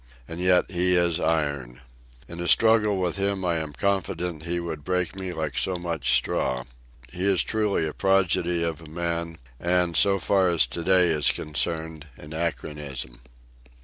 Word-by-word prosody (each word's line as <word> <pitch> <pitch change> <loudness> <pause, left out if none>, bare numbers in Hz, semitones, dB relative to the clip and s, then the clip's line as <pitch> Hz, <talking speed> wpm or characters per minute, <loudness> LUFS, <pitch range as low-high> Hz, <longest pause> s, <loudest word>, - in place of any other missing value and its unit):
And 80 +1 -7
yet 90 0 +3
he 90 0 +2
is 85 -1 +2
iron. 70 -7 -1 0.5
In 85 - -9
a 85 - -3
struggle 110 -2 +4
with 90 0 -1
him 100 -1 -1
I 85 -2 +1
am 80 -2 -4
confident 90 0 -2
that 80 +2 -9
he 85 0 0
would 80 -4 -6
break 90 +1 -1
me 95 -1 -4
like 80 -5 -4
so 95 - 0
much 85 -2 0
straw. 65 -1 0 0.5
He 90 +2 -1
is 95 -3 +3
truly 105 -6 0
a 75 - -4
prodigy 90 -3 +1
of 85 -1 -3
a 80 - -12
man, 85 0 -3 0.2
and, 90 -1 +1
so 100 -1 +5
far 95 +1 +2
as 85 -7 +3
to 65 +8 -6
day 90 -1 +4
is 75 -3 +3
concerned, 80 0 -3
an 75 +1 -11
anachronism. 75 -6 -4
85 Hz, 175 wpm, -25 LUFS, 80-90 Hz, 0.5 s, so